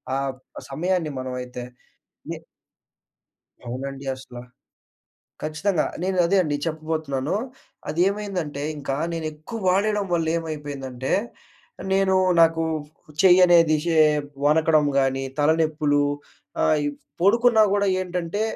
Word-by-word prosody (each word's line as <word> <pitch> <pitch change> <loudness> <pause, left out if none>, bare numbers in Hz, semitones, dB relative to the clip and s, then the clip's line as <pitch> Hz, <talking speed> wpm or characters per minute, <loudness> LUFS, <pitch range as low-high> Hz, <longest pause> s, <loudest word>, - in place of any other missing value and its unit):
ఆ - - +1 0.2
బ్ 130 - -13
సమయాన్ని 175 +1 -1
మనమైతే. 125 -1 -5 0.7
ఏ - - -7 1.3
అవునండి 135 +2 -5
అసల. 130 -2 -11 1.0
ఖచ్చితంగా 155 +3 0 0.2
నేనదే 185 0 +2
అండి 150 -3 -1
చెప్పబోతున్నాను. 155 -3 -2 0.6
అదేమైందంటే 180 -3 -1 0.2
ఇంకా 135 -1 -3 0.2
నేనెక్కువ 155 +7 -5
వాడెయ్యడం 205 +2 +1
వల్లేమైపోయిందంటే 145 -6 -3 0.8
నేను 190 0 +3 0.3
నాకు 165 0 +4 0.6
చెయ్యనేది 175 -3 +6
షే 165 -2 +1 0.5
వనకడం 155 0 +4
గానీ 135 0 0 0.2
తలనొప్పులు. 150 -1 +2 0.6
ఆహ్, 155 - +3
ఈ - - +1 0.3
పొడుకున్నా 225 +3 +5
గూడా 200 0 +2
ఏంటంటే 180 +2 -3
160 Hz, 90 wpm, -23 LUFS, 145-180 Hz, 1.3 s, చెయ్యనేది